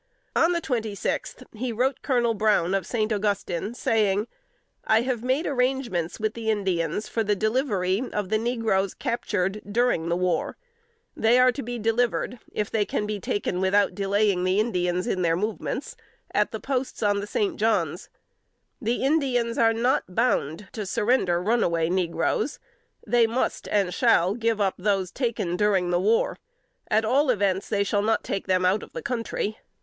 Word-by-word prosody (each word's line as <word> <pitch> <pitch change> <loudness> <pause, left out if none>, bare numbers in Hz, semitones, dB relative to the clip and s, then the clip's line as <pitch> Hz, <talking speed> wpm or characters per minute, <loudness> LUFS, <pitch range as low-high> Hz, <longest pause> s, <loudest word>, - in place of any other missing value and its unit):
On 335 - +4
the 340 -1 0
twenty 225 -8 -2
sixth, - - -3
he 240 +3 -3
wrote 250 +4 0
Colonel 240 -4 +1
Brown, 210 -4 +2
of 195 -1 -1
St. 220 -2 0
Augustine, 200 0 -2
saying: 210 -3 +1 0.6
"I 220 0 +3
have 245 -2 -2
made 260 +6 +1
arrangements 250 - -1
with 215 0 -1
the 225 -1 -4
Indians 190 -2 -1
for 225 - -1
the 210 0 +1
delivery 215 -3 0
of 205 -3 -2
the 215 0 +2
negroes 225 -5 0
captured 210 -6 -2
during 225 -8 +1
the 170 - +1
war. 180 0 -1 0.6
They 225 +2 +4
are 255 0 +6
to 275 - -5
be 245 0 -5
delivered, 235 +2 0
if 210 -1 -3
they 220 -2 +2
can 210 - -2
be 210 -1 -3
taken 185 -1 -2
without 200 +2 +3
delaying 200 -1 +1
the 185 +2 +2
Indians 180 -5 0
in 190 -6 -1
their 165 -2 +2
movements, 210 +5 -3 0.4
at - - +2
the - - -4
posts 260 -3 -3
on 205 -1 +2
the 200 - -5
St. 205 -1 -1
John's. 220 +1 0 0.7
The 235 +2 -1
Indians 260 -5 +1
are 225 -1 +5
not 225 -5 0
bound 200 - 0
to 210 -3 -5
surrender 195 -4 +1
runaway 175 -5 +1
negroes. 180 - 0 0.5
They 240 -2 +4
must, 240 +3 -2
and 195 -4 +1
shall, 180 +3 +3
give 230 -1 0
up 195 -2 +2
those 195 -2 0
taken 220 -9 -2
during 190 -3 +2
the 175 - +2
war: 215 +5 +1 0.5
at 220 +1 +2
all 275 +5 +2
events, 200 -5 +1
they 200 -1 +1
shall 200 0 0
not 220 +2 +1
take 195 - -3
them 185 -1 +2
out 190 +3 +2
of - - -12
the - - -6
country. 230 - -3
215 Hz, 170 wpm, -25 LUFS, 190-235 Hz, 0.7 s, are